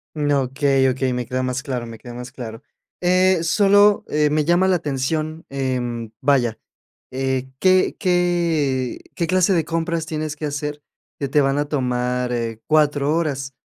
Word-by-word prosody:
Mm, 145 -1 0
okey, 135 0 +2
okey, 130 0 -1
me 125 0 -2
queda 130 +2 -2
más 130 +1 -2
claro, 130 -5 -3
me 115 -1 -9
queda 120 +2 -10
más 125 +1 -8
claro. 115 -4 -8 0.4
Eh, 185 -1 +3
solo, 205 +3 +4
eh, 150 0 +2
me 150 0 +1
llama 175 +3 +3
la 185 -1 +3
atención, 155 +2 -3
em, 125 -4 -3
vaya, 125 -6 +2 0.5
eh, 130 0 -2
¿qué 185 +2 +3
qué 170 -8 +1 0.2
qué 170 - -1
clase 185 +2 +3
de 165 -3 +1
compras 165 0 -2
tienes 155 -1 -4
que 155 - -7
hacer 150 0 -4 0.4
que 140 - -2
te 145 +2 +3
van 135 0 +2
a 145 - 0
tomar, 125 -2 -1
eh, 115 -2 -3
4 150 -1 +2
horas? 140 -5 -2
145 Hz, 165 wpm, -21 LUFS, 130-165 Hz, 0.5 s, solo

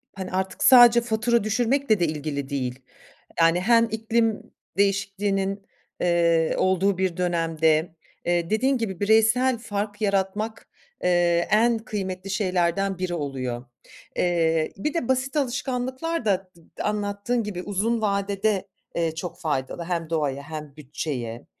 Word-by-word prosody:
hani, 190 -2 -6
artık 190 0 -2
sadece 240 -2 +8
fatura 235 0 +1
düşürmekle 230 +1 +1
de 175 - +3
ilgili 145 -3 -4
değil. 130 -3 -3 0.6
Yani 165 +2 +4
hem 230 +3 +5
iklim 225 0 -1 0.2
değişikliğinin, 195 0 0 0.3
eee, 170 -2 +2
olduğu 190 +1 +2
bir 185 -2 -1
dönemde, 165 -2 +1 0.3
eee, 175 -1 0
dediğin 260 +5 +2
gibi 205 -6 -4
bireysel 225 +4 +3
fark 205 -2 -4
yaratmak, 205 +2 -1 0.4
eee, 175 -1 +2
en 230 +2 +4
kıymetli 195 -4 -5
şeylerden 190 -1 0
biri 180 -1 -2
oluyor. 130 -6 -4 0.5
Eee, 165 -2 +1
bir 295 +10 -2
de 335 -9 -2
basit 260 +2 0
alışkanlıklar 260 +2 -2
da 195 -2 0 0.3
d - - -3
anlattığın 210 +3 -1
gibi 195 -4 -5
uzun 215 +4 0
vadede, 200 -1 0 0.3
eee, 165 -2 0
çok 175 +1 -6
faydalı 150 +1 -2
hem 165 -2 -3
doğaya 145 -4 -1
hem 150 -1 -8
bütçeye. 125 -5 -5
195 Hz, 130 wpm, -24 LUFS, 170-220 Hz, 0.6 s, sadece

